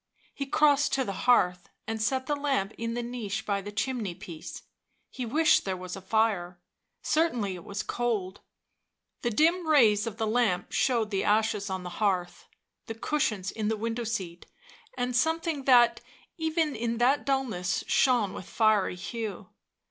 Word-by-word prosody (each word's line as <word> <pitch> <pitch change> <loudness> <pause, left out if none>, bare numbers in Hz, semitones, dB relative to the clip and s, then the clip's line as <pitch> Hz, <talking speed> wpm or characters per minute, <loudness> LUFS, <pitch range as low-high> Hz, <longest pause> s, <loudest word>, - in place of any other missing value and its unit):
He 275 - -5
crossed 290 0 +3
to 270 - +2
the 195 - -3 0.2
hearth 180 -7 +3 0.2
and 225 0 -3
set 260 +4 0
the 295 - 0
lamp 270 -8 -1
in 230 0 -3
the 240 - -2
niche 220 -3 -4
by 200 -1 -1
the 205 +1 -7
chimney 215 -4 -2
piece; 170 -4 -9 0.5
he 250 -2 -5
wished 310 +7 +4
there 190 -1 -3
was 180 0 -7
a 195 - -8
fire 190 -4 0 0.2
— - - -54
certainly 245 - +1
it 175 -2 -9
was 200 +1 -4
cold. 215 -6 -2 0.8
The 240 - 0
dim 330 +9 +2
rays 230 -8 +4
of 220 -1 -5
the 225 - -1
lamp 215 -5 +1
showed 230 -4 +1
the 195 -1 0
ashes 210 -1 +1
on 190 -1 -3
the 180 - -6
hearth, 185 -4 -1 0.4
the 225 - -5
cushions 215 -7 -1
in 215 -1 -3
the 220 0 0
window 230 +2 -3
seat, 190 -7 -4 0.5
and 250 0 -1
something 320 0 0
that, 240 -3 +5 0.3
even 320 -3 0
in 230 +1 -2
that 255 +4 +3
dullness, 235 -10 -1
shone 240 -7 +2
with 185 - -8
fiery 215 -5 +2
hue. 220 +3 -6
225 Hz, 170 wpm, -28 LUFS, 195-260 Hz, 0.8 s, that